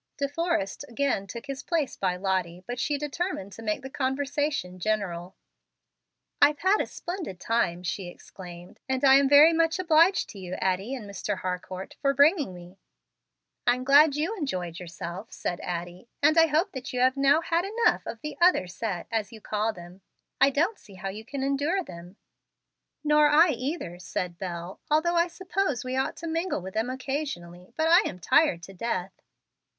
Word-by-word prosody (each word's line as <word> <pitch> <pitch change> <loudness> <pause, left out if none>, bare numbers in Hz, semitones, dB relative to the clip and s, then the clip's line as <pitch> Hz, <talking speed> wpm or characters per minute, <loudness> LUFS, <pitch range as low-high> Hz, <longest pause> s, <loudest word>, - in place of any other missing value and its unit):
De 280 - 0
Forrest 310 - -1
again 235 -5 -1
took 230 +7 -8
his 275 -1 -5
place 325 -6 -1
by 185 -2 0
Lottie, 180 -2 -2
but 245 +3 -5
she 290 +2 0
determined 295 - -3
to 210 - -10
make 220 +4 -2
the 265 - -6
conversation 275 -7 -2
general. 185 -3 -2 1.1
"I've 290 +1 +6
had 385 +6 +3
a - - -3
splendid 345 - -6
time," 180 -7 0
she 185 +1 -3
exclaimed, 175 0 -11
"and 260 +1 -1
am 275 0 +6
very 295 +3 +8
much 325 +1 +2
obliged 340 +1 +4
to 200 - -10
you, 185 -1 -5
Addie 190 +7 -1
and 225 -6 -8
Mr. 200 0 -3
Harcourt, 185 +1 -5
for 275 -1 +2
bringing 290 - +4
me." 180 +1 -12 0.9
"I'm 245 +1 +3
glad 285 +2 +6
you 325 +9 -1
enjoyed 180 - -4
yourself," 175 +3 -7
said 175 - -4
Addie, 175 +4 -6
"and 305 +2 +5
hope 325 +3 +4
that 260 -1 -6
you 250 - -1
have 260 +1 +4
now 280 +3 +4
had 335 +1 0
enough 445 +4 +1
of 225 - -6
the 300 - -5
'other 350 - +5
set,' 180 0 -4
as 220 -2 -1
you 225 - -11
call 215 +1 -1
them. 175 0 -13 0.4
I 275 - +7
don't 335 +10 0
see 200 - -16
how 195 +1 -5
you 210 +3 -7
can 265 +3 -5
endure 290 +8 0
them." 175 - -11 0.9
"Nor 300 0 +5
I 315 +4 +6
either," 255 - -3
said 180 -1 -4
Bel, 175 0 -6
"although 315 +3 +2
I 340 0 +3
suppose 360 -5 -2
we 255 0 -3
ought 265 - -1
to 335 - -6
mingle 330 +3 -1
with 190 0 -7
them 220 +3 -1
occasionally. 255 - -5
But 315 - +2
I 345 +3 +7
am 180 - -8
tired 180 - +3
to 195 - -10
death." 190 -2 -4
255 Hz, 180 wpm, -27 LUFS, 185-300 Hz, 1.1 s, very